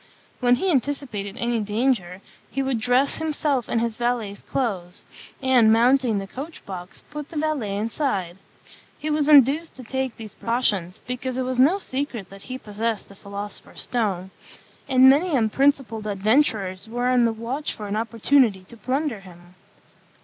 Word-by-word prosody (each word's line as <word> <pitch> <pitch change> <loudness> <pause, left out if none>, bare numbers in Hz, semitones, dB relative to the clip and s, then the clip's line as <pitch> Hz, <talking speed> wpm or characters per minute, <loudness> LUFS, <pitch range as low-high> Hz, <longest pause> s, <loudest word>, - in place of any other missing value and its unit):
When 245 -1 +4
he 375 +9 0
anticipated 250 -7 -2
any 235 -1 0
danger, 210 -4 0 0.3
he 275 - -2
would 265 -3 0
dress 250 +4 +2
himself 295 -5 -1
in - - +1
his 230 -1 -1
valet's 235 -4 -1
clothes, 190 -9 -3 0.4
and, 250 -4 +5
mounting 240 0 +4
the 195 - -3
coach 280 +11 -8
box, 185 -1 -8
put 295 0 -6
the 330 - -7
valet 290 -10 -1
inside. 205 - -2 0.6
He 305 - -3
was 300 -1 +1
induced 295 +3 +5
to 260 - -9
take 265 +1 -3
these 220 -3 -9
precautions, 205 -7 -1
because 250 +1 -4
it 260 - 0
was 255 0 -2
no 305 +9 +5
secret 260 - -4
that 195 0 -11
he 255 - -3
possessed 220 -1 -3
the 200 - -13
philosopher's 200 +1 -7
stone; 195 -6 -1 0.6
and 260 0 +7
many 300 +5 +5
unprincipled 235 -1 +1
adventurers 205 -2 +1
were 245 +2 -2
on 250 -1 +4
the 230 - +2
watch 235 +7 -3
for 210 - -7
an 200 - -2
opportunity 225 -1 +2
to 235 - -13
plunder 260 +1 -1
him. 175 -2 -15
240 Hz, 160 wpm, -24 LUFS, 205-270 Hz, 0.6 s, and